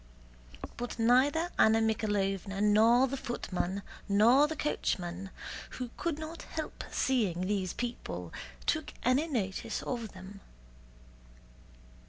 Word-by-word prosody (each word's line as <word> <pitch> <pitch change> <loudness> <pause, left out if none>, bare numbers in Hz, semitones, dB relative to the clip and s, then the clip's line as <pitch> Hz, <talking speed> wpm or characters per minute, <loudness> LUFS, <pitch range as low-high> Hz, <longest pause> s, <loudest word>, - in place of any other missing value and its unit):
But 245 0 -4
neither 270 +9 +3
Anna 220 0 +6
Mikháylovna 205 -3 0
nor 220 +5 +5
the 275 +1 -3
footman 195 -6 -3 0.3
nor 235 +8 +6
the 315 - -4
coachman, 185 - -2 0.5
who 250 -2 -4
could 335 -4 -2
not 315 +1 -6
help 315 -1 -5
seeing 210 -10 +1
these 190 -1 -1
people, 90 - -5 0.3
took - - -1
any 260 +6 +3
notice 205 - -2
of 235 -5 -4
them. 190 +2 -10
225 Hz, 110 wpm, -31 LUFS, 195-260 Hz, 0.5 s, Anna